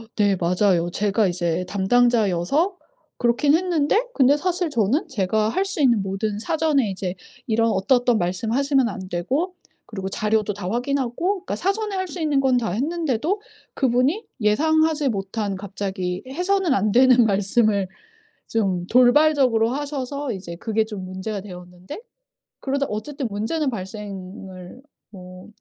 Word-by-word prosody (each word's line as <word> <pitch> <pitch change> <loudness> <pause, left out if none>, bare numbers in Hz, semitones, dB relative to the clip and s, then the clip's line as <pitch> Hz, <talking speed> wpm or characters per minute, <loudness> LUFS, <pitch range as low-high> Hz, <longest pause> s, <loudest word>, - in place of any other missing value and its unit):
네. 205 -2 +3
맞아요. 175 -1 +2
제가 205 +2 +1
이제 175 0 -1
담당자여서 235 - +2 0.4
그렇긴 250 +5 +3
했는데 345 +1 +2
근데 275 +1 +4
사실 355 +1 -1
저는 240 - +1
제가 215 - 0
할 380 - 0
수 390 -5 -3
있는 235 -7 +3
모든 195 +2 -2
사전에 295 -3 +1
이제 185 -1 -4 0.3
이런 230 0 +2
어떠어떤 240 +4 +2
말씀 185 +6 -2
하시면 270 -1 +2
안 190 -2 -7
되고 270 - -2 0.3
그리고 195 -3 -5
자료도 210 0 0
다 190 -2 -5
확인하고. 280 - -1
그러니까 - - -3
사전에 400 +2 -1
할 375 0 -2
수 355 0 -7
있는 295 -3 +2
건 260 -2 +3
다 230 -6 -1
했는데도 315 - -1 0.3
그분이 265 - +1 0.2
예상하지 310 +6 +2
못한 200 -1 -3
갑자기 190 -2 -4
해서는 360 +3 0
안 205 +2 +1
되는 250 0 +6
말씀을 200 0 +2 0.6
좀 190 -6 -1
돌발적으로 250 -2 +4
하셔서 280 -1 -3
이제 180 -3 -7
그게 220 +3 0
좀 210 -4 -7
문제가 190 +3 -5
되었는데 180 - -10 0.6
그러다 280 +1 -1
어쨌든 265 +6 -4
문제는 225 +9 -1
발생을 190 -1 -8 0.3
뭐 185 -2 -12
225 Hz, 315 characters per minute, -22 LUFS, 195-285 Hz, 0.6 s, 되는